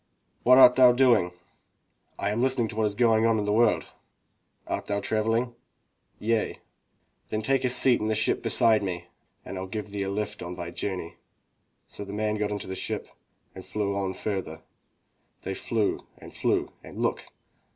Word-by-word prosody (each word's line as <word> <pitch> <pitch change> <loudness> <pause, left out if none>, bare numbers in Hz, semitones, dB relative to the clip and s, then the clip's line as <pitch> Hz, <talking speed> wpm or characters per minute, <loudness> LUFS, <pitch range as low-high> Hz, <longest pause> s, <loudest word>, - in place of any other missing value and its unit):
"What 125 +1 +6
art 125 -1 +8
thou 125 -1 +7
doing?" 120 -8 +3 0.9
"I 100 - -1
am 110 +3 -1
listening 130 -3 +2
to - - -7
what 110 -1 +1
is 100 - -5
going 115 -1 +3
on 115 -1 +2
in 105 - -1
the 105 - 0
world." 115 0 +2 0.7
"Art - - -4
thou 100 0 -1
traveling?" 115 +4 0 0.6
"Yea." 115 0 -1 0.7
"Then 110 0 -2
take 135 +3 +1
a 125 - +2
seat 125 0 +5
in 110 - -1
the 110 - +1
ship 110 +1 +1
beside 110 -2 +4
me. 90 -3 -4 0.4
rU 95 0 -6
give 105 +2 -6
thee 100 -1 -4
a 95 - -2
lift 105 +1 -4
on 90 +1 -6
thy 85 -1 -6
journey." 90 -1 -5 0.7
So - - -9
the 100 0 -8
man 105 0 -1
got 105 0 -1
into 100 -1 -4
the 95 - -5
ship - - -4 0.4
and - - -10
they - - -17
flew 100 -2 -2
on 95 -2 -2
further. 90 -6 -4 0.8
They 95 - -3
flew 110 +1 -2
and - - -13
flew - - 0
and - - -11
look! - - -1
105 Hz, 180 wpm, -26 LUFS, 100-115 Hz, 0.9 s, art